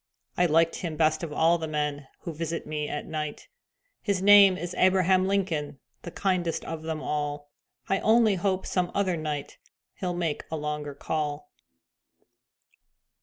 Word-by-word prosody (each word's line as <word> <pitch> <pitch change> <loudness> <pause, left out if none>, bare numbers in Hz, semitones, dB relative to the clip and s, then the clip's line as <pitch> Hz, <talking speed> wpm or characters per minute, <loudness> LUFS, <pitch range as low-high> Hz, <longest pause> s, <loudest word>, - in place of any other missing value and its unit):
I 180 - +3
liked 165 +1 +3
him 165 -4 -4
best 155 -1 +2
of 165 -3 -5
all 165 +3 +3
the 160 - -3
men 150 -2 -2
Who 170 - -5
visit 165 +1 -4
me 150 -1 -3
at 150 - -4
night. 155 -2 -5 0.5
His 200 -3 0
name 200 -1 +7
is 175 +1 -5
Abraham 185 0 +3
Lincoln, 175 -8 -1 0.2
The - - -7
kindest 175 -1 -1
of 165 -1 -5
them 160 -1 -4
all. 145 -1 -3 0.4
I 195 - +1
only 220 -1 +4
hope 190 0 -1
some 180 -1 0
other 190 -3 +1
night 150 -3 -5 0.3
He'll 180 -2 -3
make 165 -4 -2
a 160 - -3
longer 150 -1 -4
call. 150 0 -3
165 Hz, 155 wpm, -27 LUFS, 150-185 Hz, 0.5 s, name